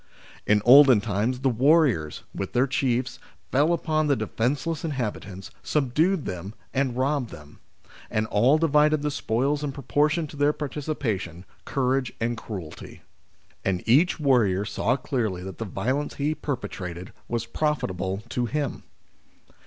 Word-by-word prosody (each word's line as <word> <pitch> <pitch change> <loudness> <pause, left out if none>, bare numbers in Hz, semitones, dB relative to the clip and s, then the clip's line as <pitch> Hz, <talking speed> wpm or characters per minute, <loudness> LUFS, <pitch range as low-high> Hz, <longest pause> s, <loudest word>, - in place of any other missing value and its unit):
In 105 -1 +3
olden 130 -2 +8
times, 110 +5 -1
the 135 - +3
warriors, 130 - +2
with 95 - -5
their 125 +2 +3
chiefs, 130 -1 -1 0.3
fell 145 +5 +3
upon 155 -2 0
the 140 - +3
defenceless 135 +8 -2
inhabitants, 105 - -4
subdued 155 +5 +1
them, 95 +4 -6 0.2
and 130 -2 0
robbed 135 -2 0
them; 75 -2 -13 0.5
and 110 0 0
all 120 +7 +3
divided 150 -1 +3
the 150 - 0
spoils 140 +3 0
in 145 - -2
proportion 150 +3 0
to 150 - -11
their 145 +1 +2
participation, 125 - -4 0.2
courage, 130 -2 0
and 120 +1 -1
cruelty; 95 -8 -8 0.6
and 95 0 -2
each 150 +12 +4
warrior 110 -9 +2
saw 120 +4 0
clearly 110 - -2
that 95 0 -8
the 115 - -3
violence 130 +9 -2
he 145 +2 0
perpetrated 90 - -5
was 115 -1 -2
profitable 100 - -2
to 120 0 -1
him. 145 0 -2
130 Hz, 135 wpm, -25 LUFS, 105-145 Hz, 0.6 s, olden